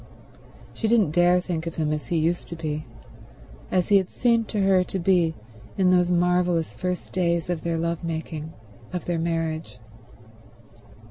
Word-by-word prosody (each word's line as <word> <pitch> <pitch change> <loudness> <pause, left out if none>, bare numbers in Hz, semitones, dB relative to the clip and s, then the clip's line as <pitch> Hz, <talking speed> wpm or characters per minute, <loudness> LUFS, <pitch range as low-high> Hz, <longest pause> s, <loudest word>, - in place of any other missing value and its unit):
She 225 - -2
didn't 215 -8 +3
dare 175 +2 +4
think 170 -2 -3
of 165 - -5
him 155 -2 0
as 150 - -4
he 170 - 0
used 165 +2 0
to 170 - -6
be, 155 -3 -4 0.8
as 180 -2 +1
he 200 - +7
had 190 -2 0
seemed 230 -2 +1
to 210 - -1
her 190 -1 +4
to 190 - -4
be 175 -3 +2 0.4
in 185 -1 +4
those 180 -1 +3
marvelous 175 -1 +2
first 180 -1 -3
days 170 -2 0
of 170 -3 -2
their 170 -1 -1
love 170 +1 -2
making, 160 -1 -4 0.4
of 180 -2 -4
their 175 -2 -1
marriage. 165 -1 -2
175 Hz, 170 wpm, -25 LUFS, 165-180 Hz, 0.8 s, he